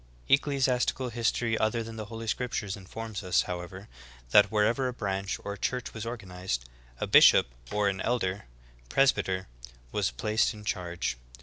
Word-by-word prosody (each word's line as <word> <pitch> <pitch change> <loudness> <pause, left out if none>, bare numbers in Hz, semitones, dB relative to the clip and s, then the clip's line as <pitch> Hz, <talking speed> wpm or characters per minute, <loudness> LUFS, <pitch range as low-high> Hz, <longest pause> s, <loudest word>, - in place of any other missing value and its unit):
3. - - +2
Ecclesiastical 135 -3 +2
history 115 0 0
other 110 +2 +1
than 115 0 -8
the 110 -1 -5
holy 115 +2 -7
bcriptures 115 -4 -2
informs 105 +2 -7
us, 90 -2 +2
however, 90 +3 -6 0.4
that 105 - +7
wherever 115 +5 +2
a 125 - -3
branch, 100 -4 -2
or 100 - -4
church, 125 +4 -3
was 110 0 -5
organized, 90 - -4 0.3
a - - -1
bishop - - +7 0.2
or 105 -1 +1
an 95 -1 -1
elder 105 -5 -1 0.4
(presbyter) 95 - +2 0.4
was - - +1
placed 110 - 0
in 105 0 -11
charge. 85 -8 -2
105 Hz, 150 wpm, -29 LUFS, 95-115 Hz, 0.4 s, that